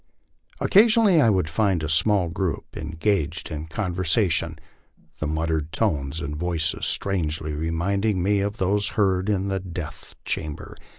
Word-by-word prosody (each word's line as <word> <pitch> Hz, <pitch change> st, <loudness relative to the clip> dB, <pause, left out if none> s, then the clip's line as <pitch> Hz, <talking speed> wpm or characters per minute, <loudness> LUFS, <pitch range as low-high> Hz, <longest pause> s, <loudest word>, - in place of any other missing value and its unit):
Occasion 225 Hz, +3 st, +5 dB
ally 190 Hz, -6 st, +5 dB
I 115 Hz, -, +5 dB
would 95 Hz, -6 st, +1 dB
find 95 Hz, -1 st, +1 dB
a -, -, -1 dB
small 90 Hz, +4 st, +3 dB
group 90 Hz, -1 st, -3 dB
engaged 80 Hz, -2 st, -2 dB
in 75 Hz, +1 st, -5 dB
conversation, 85 Hz, -3 st, 0 dB, 0.6 s
the 80 Hz, -, -2 dB
muttered 80 Hz, 0 st, -1 dB
tones 70 Hz, +2 st, -1 dB
and 75 Hz, -2 st, -4 dB
voices 85 Hz, 0 st, -1 dB
strangety 80 Hz, -5 st, -1 dB
reminding 90 Hz, +5 st, 0 dB
me 100 Hz, +1 st, +2 dB
of 100 Hz, +2 st, -2 dB
those 100 Hz, +2 st, +1 dB
heard 95 Hz, -1 st, +2 dB
in 100 Hz, -1 st, 0 dB
the 95 Hz, 0 st, -1 dB
death 90 Hz, -2 st, -8 dB
chamber. 75 Hz, -2 st, -4 dB
90 Hz, 140 wpm, -24 LUFS, 80-100 Hz, 0.6 s, Occasion